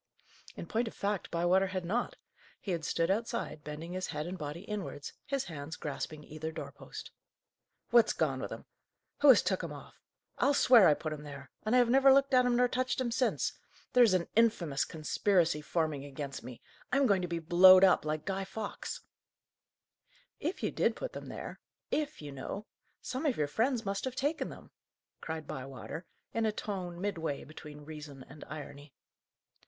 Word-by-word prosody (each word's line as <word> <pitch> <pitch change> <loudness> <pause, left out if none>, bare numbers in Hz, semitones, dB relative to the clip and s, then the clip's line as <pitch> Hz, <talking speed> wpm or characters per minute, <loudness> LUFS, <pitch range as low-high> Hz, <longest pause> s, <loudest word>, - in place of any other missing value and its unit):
In - - -6
point 230 +2 0
of - - -7
fact, 200 -1 -2
Bywater 175 +3 +3
had 185 -1 -3
not. 240 - -1 0.4
He 195 - -4
had 170 -2 -1
stood 165 +4 +1
outside, 205 -7 -2
bending 155 +3 -6
his 185 0 -2
head 150 - -3
and 180 +2 -4
body 150 0 -5
inwards, 200 -8 -5
his 275 -2 0
hands 155 -2 -6
grasping 150 +1 -5
either 155 +2 -6
door - - -6
post. - - -10 0.8
"What's 235 -2 +6
gone - - 0
with - - -5
'em? - - -7 0.5
who 290 - +6
'as 260 - +8
took - - 0
'em - - -4
off? - - -11 0.4
I'll 285 - +4
swear 240 -8 +7
I 150 - +5
put 155 0 -4
'em 150 - -7
there, 140 -2 -10
and 220 +3 +1
I - - +7
have 245 -1 +4
never 270 +1 +7
looked 275 0 +4
at 250 -1 +6
'em 245 - +3
nor 250 +1 +4
touched 255 +1 -1
'em 250 -2 0
since! 250 +1 +1 0.4
There's 240 -6 +6
an 175 -2 0
infamous 190 -11 +3
conspiracy 165 0 +1
forming 155 -3 -1
against 140 -1 -6
me! 120 0 -10 0.3
I'm 275 +2 +4
going 200 -6 +3
to 180 - -2
be 170 -1 -2
blowed 185 +3 +8
up, 190 - +6
like 155 0 -2
Guy 195 +1 -1
Fawkes!" 220 - -5 1.4
"If 335 +7 -3
you - - +1
did - - +1
put - - -5
them - - -7
there - - -7 0.3
'if,' 300 - -2
you 145 - -6
know 140 +10 -6 0.4
some 265 +5 -2
of 265 - +1
your 150 - +2
friends 225 - 0
must 195 +3 -2
have 260 -1 -3
taken 290 +5 -1
them," - - -12 0.5
cried 160 -1 -5
Bywater, 135 +6 -7 0.3
in 225 -1 +1
a - - +2
tone 185 -5 -5
midway 165 -7 -2
between 150 0 -11
reason 145 -3 -9
and 150 - -11
irony. 145 -2 -9
180 Hz, 185 wpm, -32 LUFS, 150-230 Hz, 1.4 s, as